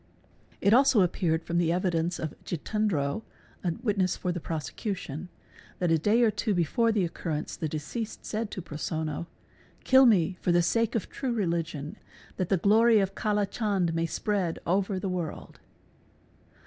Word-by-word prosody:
It 200 - +4
also 260 -3 +6
appeared 165 -2 0
from 170 +1 0
the 165 -1 +2
evidence 175 -1 0
of 155 -2 -4
J 175 - -3
itendro, 185 -4 -1 0.4
a 175 -3 0
witness 195 -5 +1
for 180 - -2
the 175 - -3
prosecution, 170 - -5 0.5
that 175 -2 0
a 165 - +4
day 215 +8 +3
or 225 - +4
two 205 -3 0
fore 230 +8 +2
the 205 -4 +1
occurrence 165 -2 -4
the 160 - -3
deceased 160 +10 -5
said 220 0 -3
to 185 - -6
Prosonno, 155 0 -4 0.3
" - - -30
Kill 260 0 +7
me 185 -4 +3
for 180 - +1
the 175 0 +4
sake 230 +5 +1
it 220 - 0
true 265 -2 -3
religion 170 -4 -2 0.4
that 185 -3 -1
the 195 - +3
glory 220 +5 +5
of 195 -1 0
Kala 210 0 0
Chand 195 -5 0
may 165 0 0
spread 190 -3 -1
over 190 +2 +1
the 185 - -3
world." 180 -4 -5
185 Hz, 170 wpm, -28 LUFS, 165-210 Hz, 0.5 s, Kill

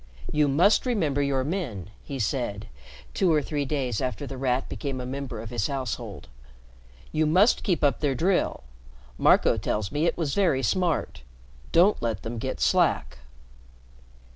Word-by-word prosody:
"You 150 -1 +3
must 180 - +3
remember 160 - +1
your 140 -2 +1
men," 130 - -4
he 140 - -6
said, 105 -3 -2 0.5
two 185 -3 +2
or 155 - +4
three 145 0 -2
days 130 -6 -2
after 130 +2 -3
The 135 - -6
Rat 130 0 0
became 135 -3 -4
a 125 - -5
member 130 -3 -5
of 110 0 -8
his 120 -5 -1
household. 120 - -5 0.8
"You 155 0 +1
must 185 +9 +4
keep 175 -7 0
up 140 -5 +2
their 140 -3 0
drill. 175 - 0 0.6
Marco - - +4
tells 105 -2 -2
me 150 +3 +1
it - - 0
was 155 -5 -1
very 165 -10 +2
smart. 165 - 0 0.5
Don't 185 +5 +4
let 115 -4 -2
them 115 +1 -5
get 130 +4 -4
slack." 95 - +1
140 Hz, 160 wpm, -26 LUFS, 120-160 Hz, 0.8 s, or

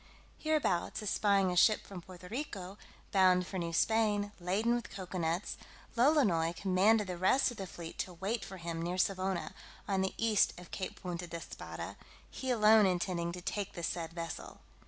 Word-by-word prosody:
Hereabouts 300 - 0
espying 200 -2 +2
a - - -2
ship 215 +4 +5
from 190 -3 -8
Puerto 180 0 -12
Rico, 205 -5 -5 0.3
bound 185 -2 +5
for 190 0 -4
New 170 -1 -2
Spain, 205 +2 +2
laden 200 +7 +1
with 240 0 -2
cocoa 185 -1 -6
nuts, 170 +3 -1 0.4
Lolonois 230 - +4
commanded 200 +4 +3
the 180 -2 -5
rest 255 +8 +4
of 240 - -10
the 195 - -5
fleet 170 -2 -9
to 180 - -2
wait 195 +5 -2
for 190 +1 -8
him 170 -1 -4
near 175 +2 -2
Savona, 185 -1 0 0.3
on 195 -2 +1
the 190 - -1
east 220 -5 +2
of 180 - -13
Cape 185 -2 -5
Punta 175 -1 -4
d'Espada, 170 -1 -7 0.3
he 260 - -5
alone 215 -3 +6
intending 175 -1 -1
to 180 +1 -7
take 200 +1 -3
the 170 - -6
said 165 0 -2
vessel. 165 0 -6
190 Hz, 175 wpm, -33 LUFS, 175-210 Hz, 0.4 s, alone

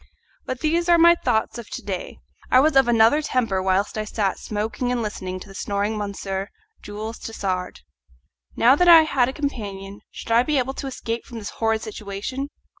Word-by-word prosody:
But 255 -1 -4
these 335 +3 +1
are 345 - +6
my 340 +1 +7
thoughts 220 -7 -1
of 235 - -10
to - - -7
day; 190 -3 -5 0.3
I 255 - +6
was 295 +2 +3
of 270 -2 +5
another 235 +5 +4
temper 230 -10 0
whilst 190 +3 0
I - - -1
sat 205 -2 -1
smoking 220 +4 -3
and 240 -2 -1
listening 185 -3 -5
to - - -10
the 195 - -12
snoring 200 +1 -2
of 215 - -4
Monsieur 195 0 -4 0.3
Jules 215 +2 -7
Tassard. 185 - -4 0.7
Now 245 +4 +5
that 355 +4 +2
I 335 -2 +9
had 260 -5 +1
a - - -5
companion 205 -9 -5
should - - -8
I 230 +1 +6
be 295 +3 0
able 265 +1 0
to 275 - -6
escape 235 -3 -4
from 235 - -10
this 210 -2 -6
horrid 225 -1 -1
situation? 215 +6 -5
225 Hz, 195 wpm, -23 LUFS, 200-265 Hz, 0.7 s, I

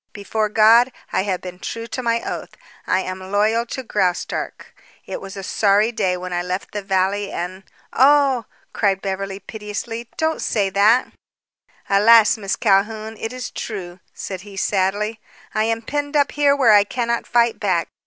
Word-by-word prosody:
Before 215 +1 -2
God, 225 +4 +5 0.2
I - - +2
have 185 -3 -2
been 180 0 -9
true 230 +4 -5
to 255 - -5
my 235 -1 0
oath. - - -6 0.3
I 185 - +2
am 185 0 -5
loyal 220 +3 +2
to 265 - -5
Graustark. 190 -6 -2 0.3
It - - -6
was 195 +1 -9
a 195 - -6
sorry 205 +3 +2
day 185 -5 0
when 180 0 -6
I 175 - 0
left 180 +2 -4
the 205 - -4
valley 195 +1 0
and 185 +2 -5 0.2
" - - -35
"Oh!" 270 -2 +4 0.3
cried 195 -3 +1
Beverly 195 0 -3
piteously. 220 +3 -6
"Don't 320 0 0
say 200 -3 0
that." 215 +6 +4 0.8
"Alas, 210 +2 +6
Miss 200 -3 -2
Calhoun, 215 +1 +1
it 225 - -4
is 255 -1 -6
true," 185 -5 -6
said 190 -2 -6
he 200 0 -12
sadly, 205 +3 0 0.3
"I 215 0 +1
am 225 0 -1
penned 290 +4 -2
up 285 -1 +2
here 285 -1 +3
where 250 -6 +5
I 205 -1 +7
cannot 235 +2 -2
fight 235 -1 +2
back. 185 -5 0
210 Hz, 175 wpm, -21 LUFS, 195-230 Hz, 0.8 s, I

